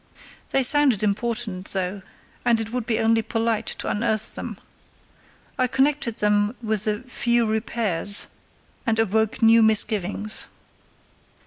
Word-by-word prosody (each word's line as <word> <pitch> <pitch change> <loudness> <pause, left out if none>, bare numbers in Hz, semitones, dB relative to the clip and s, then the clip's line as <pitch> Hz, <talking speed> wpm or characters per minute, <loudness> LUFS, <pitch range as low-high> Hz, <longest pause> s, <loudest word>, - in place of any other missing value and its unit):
They 270 - +2
sounded 265 -6 +4
important, 210 -2 -2
though, 190 +1 -2 0.4
and 235 -2 +3
it 225 0 -4
would 245 -2 -3
be 225 -2 +1
only 225 0 +2
polite 225 0 -1
to - - -3
unearth 215 0 0
them. - - -5 1.0
I 255 - +3
connected 265 -2 +1
them 210 +2 +1
with 220 -3 0
the 210 0 -1
"few 240 -2 0
repairs," 215 -3 -1 0.6
and 225 -1 +2
awoke 220 +1 0
new 225 +1 +7
misgivings. 215 -1 +1
220 Hz, 125 wpm, -23 LUFS, 210-235 Hz, 1.0 s, new